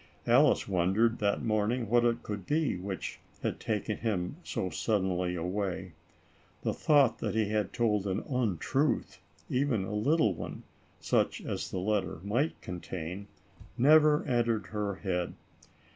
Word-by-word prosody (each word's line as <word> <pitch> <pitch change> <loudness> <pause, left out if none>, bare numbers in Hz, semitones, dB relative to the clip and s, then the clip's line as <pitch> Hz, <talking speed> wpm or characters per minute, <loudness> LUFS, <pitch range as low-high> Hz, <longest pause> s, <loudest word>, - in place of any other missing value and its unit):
Alice - - +4
wondered, 100 +5 +2
that 100 +2 +1
morning, 110 +2 0
what 120 +2 +4
it 120 0 +1
could 105 -3 -5
be, 155 -5 +1
which 95 +1 -5 0.2
had - - -2
taken 105 -1 -2
him 100 -2 -2
so 95 - -3
suddenly 90 -4 0
away. 95 +1 -3 0.7
The - - 0
thought 140 -6 +3
that - - -2
he 110 -2 +1
had 105 -2 0
told 105 -4 +1
an 95 +2 -1
untruth, 125 - 0 0.3
even 125 -6 +1
a 95 - -5
little 110 - +2
one, - - -7 0.4
such - - +1
as - - -4
the - - -4
letter 95 -2 -1
might 120 +10 0
contain, 90 +1 -6 0.5
never 150 +3 +6
entered 115 -4 +1
her 105 -2 -1
head. 90 -2 -2
105 Hz, 140 wpm, -30 LUFS, 95-120 Hz, 0.7 s, never